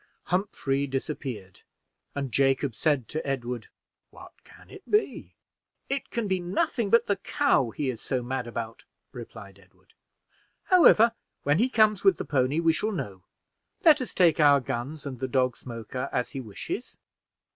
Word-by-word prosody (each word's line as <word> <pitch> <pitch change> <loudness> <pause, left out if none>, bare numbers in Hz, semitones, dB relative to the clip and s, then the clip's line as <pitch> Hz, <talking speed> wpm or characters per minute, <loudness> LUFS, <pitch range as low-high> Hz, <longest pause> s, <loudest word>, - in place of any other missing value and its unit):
Humphrey 140 -7 -1
disappeared, 130 - -5 0.5
and 140 -3 -3
Jacob 135 +1 +2
said 135 +1 0
to 155 - -3
Edward 125 -4 -3 0.4
"What - - -13
can - - -18
it 400 - -11
be?" 420 +1 0 0.5
"It 275 0 -2
can 235 -3 -2
be 190 -1 0
nothing 215 - -1
but 230 +2 +5
the 200 - 0
cow 195 - +1
he 140 +5 -3
is 115 - -10
so 130 -2 -2
mad 125 0 -3
about," 115 -1 -6 0.3
replied 110 -5 -10
Edward. 90 -1 -26 0.7
"However, 275 - +6 0.3
when 145 +4 +2
he 245 +4 +3
comes 215 -4 +3
with 195 -3 +5
the - - -4
pony, 135 +2 +1
we 165 -1 +3
shall 215 +7 -1
know; 100 - -5 0.6
let 300 -4 +7
us 250 - -4
take 170 -4 +4
our 145 -2 +6
guns 135 +4 -5
and 130 -4 -6
the 130 - -2
dog 130 -1 +1
Smoker 120 +1 -6
as 125 - -1
he 135 - -5
wishes." 110 -5 -6
140 Hz, 160 wpm, -27 LUFS, 125-195 Hz, 0.7 s, let